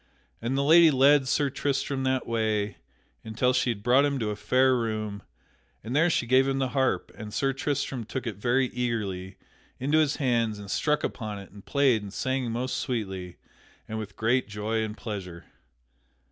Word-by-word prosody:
And 120 Hz, +4 st, -1 dB
the 140 Hz, -, +2 dB
lady 165 Hz, +3 st, +7 dB
led 140 Hz, 0 st, +5 dB
Sir 140 Hz, +1 st, +1 dB
Tristram 140 Hz, -1 st, -1 dB
that 130 Hz, -1 st, 0 dB
way 110 Hz, -3 st, -1 dB, 0.5 s
until 115 Hz, +3 st, +1 dB
she 125 Hz, 0 st, +1 dB
had 105 Hz, -4 st, -3 dB
brought 125 Hz, +4 st, +5 dB
him 140 Hz, -1 st, +1 dB
to 110 Hz, -4 st, -1 dB
a -, -, -3 dB
fair 130 Hz, +4 st, +3 dB
room, 110 Hz, -3 st, -3 dB, 0.6 s
and 115 Hz, +5 st, -4 dB
there 165 Hz, +4 st, +4 dB
she 160 Hz, -, +1 dB
gave 130 Hz, +3 st, +4 dB
him 135 Hz, 0 st, 0 dB
the 135 Hz, -1 st, 0 dB
harp, 130 Hz, 0 st, 0 dB
and 105 Hz, -1 st, -8 dB
Sir 135 Hz, +5 st, 0 dB
Tristram 135 Hz, -2 st, -2 dB
took 130 Hz, +3 st, -5 dB
it 110 Hz, -5 st, -4 dB
very 125 Hz, +4 st, +1 dB
eagerly 105 Hz, -7 st, -3 dB, 0.4 s
into 145 Hz, +5 st, +2 dB
his 150 Hz, -2 st, +2 dB
hands 115 Hz, -6 st, 0 dB
and 100 Hz, -1 st, -8 dB
struck 150 Hz, +5 st, +1 dB
upon 110 Hz, -3 st, -4 dB
it 100 Hz, -2 st, -11 dB
and 100 Hz, 0 st, -13 dB
played 135 Hz, -6 st, +2 dB
and 100 Hz, -1 st, -8 dB
sang 130 Hz, +2 st, -2 dB
most 125 Hz, +3 st, -2 dB
sweetly 95 Hz, -8 st, -4 dB, 0.5 s
and 110 Hz, 0 st, -4 dB
with 105 Hz, -2 st, -7 dB
great 120 Hz, +4 st, +1 dB
joy 110 Hz, +2 st, -2 dB
and 110 Hz, 0 st, -5 dB
pleasure. 95 Hz, -6 st, -7 dB
120 Hz, 185 wpm, -27 LUFS, 105-135 Hz, 0.6 s, lady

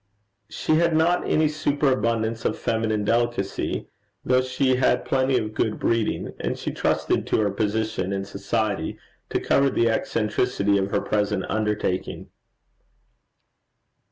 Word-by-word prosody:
She 155 Hz, -, +1 dB
had 170 Hz, -1 st, +2 dB
not 170 Hz, +3 st, +2 dB
any 155 Hz, 0 st, +3 dB
superabundance 115 Hz, -7 st, 0 dB
of -, -, 0 dB
feminine 110 Hz, -2 st, -1 dB
delicacy, 120 Hz, -3 st, -1 dB, 0.4 s
though 130 Hz, 0 st, +4 dB
she 130 Hz, 0 st, +1 dB
had 125 Hz, -1 st, +2 dB
plenty 130 Hz, -1 st, +2 dB
of 110 Hz, -2 st, -3 dB
good 110 Hz, 0 st, 0 dB
breeding, 115 Hz, -2 st, 0 dB
and -, -, -2 dB
she -, -, -4 dB
trusted -, -, 0 dB
to -, -, +1 dB
her 105 Hz, -2 st, +1 dB
position 105 Hz, -1 st, -1 dB
in 95 Hz, 0 st, -2 dB
society 100 Hz, -2 st, -2 dB, 0.3 s
to -, -, 0 dB
cover 140 Hz, 0 st, +3 dB
the 115 Hz, -3 st, +2 dB
eccentricity 105 Hz, -2 st, 0 dB
of 95 Hz, 0 st, -1 dB
her -, -, 0 dB
present 105 Hz, -3 st, 0 dB
undertaking. 105 Hz, -4 st, -2 dB
115 Hz, 130 wpm, -24 LUFS, 105-130 Hz, 0.4 s, though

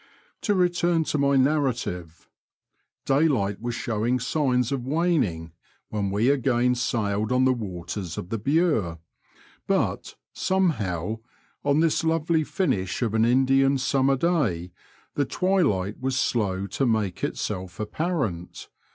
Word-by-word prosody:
To 205 Hz, -4 st, +1 dB
return 175 Hz, -2 st, +2 dB
to 150 Hz, -, -2 dB
my 140 Hz, 0 st, +3 dB
narrative. 125 Hz, -, 0 dB, 0.8 s
Daylight 135 Hz, -9 st, +1 dB
was 120 Hz, 0 st, -3 dB
showing 120 Hz, +2 st, -1 dB
signs 125 Hz, -2 st, 0 dB
of 135 Hz, -3 st, -2 dB
waning 135 Hz, -, 0 dB, 0.4 s
when 100 Hz, -2 st, -2 dB
we 105 Hz, +6 st, +2 dB
again 125 Hz, -2 st, +2 dB
sailed 110 Hz, -3 st, -1 dB
on 130 Hz, +1 st, +3 dB
the 130 Hz, -, +4 dB
waters 95 Hz, -5 st, -5 dB
of 90 Hz, -, -6 dB
the 115 Hz, -, -2 dB
Bure^ 135 Hz, -, +1 dB, 0.7 s
but, -, -, -1 dB, 0.2 s
somehow, 110 Hz, -, 0 dB, 0.4 s
on 145 Hz, +2 st, +3 dB
this 165 Hz, -1 st, +2 dB
lovely 160 Hz, 0 st, +1 dB
finish 130 Hz, -, -1 dB
of 110 Hz, -3 st, -1 dB
an 110 Hz, 0 st, +3 dB
Indian 135 Hz, +2 st, +3 dB
summer 135 Hz, +1 st, +2 dB
day 125 Hz, -, 0 dB, 0.4 s
the 145 Hz, -, 0 dB
twilight 140 Hz, -, 0 dB
was 130 Hz, 0 st, -1 dB
slow 100 Hz, -6 st, 0 dB
to 125 Hz, +7 st, -1 dB
make 105 Hz, -6 st, -1 dB
itself 95 Hz, -4 st, -3 dB
apparent. 110 Hz, -, -3 dB
125 Hz, 125 wpm, -25 LUFS, 100-145 Hz, 0.8 s, the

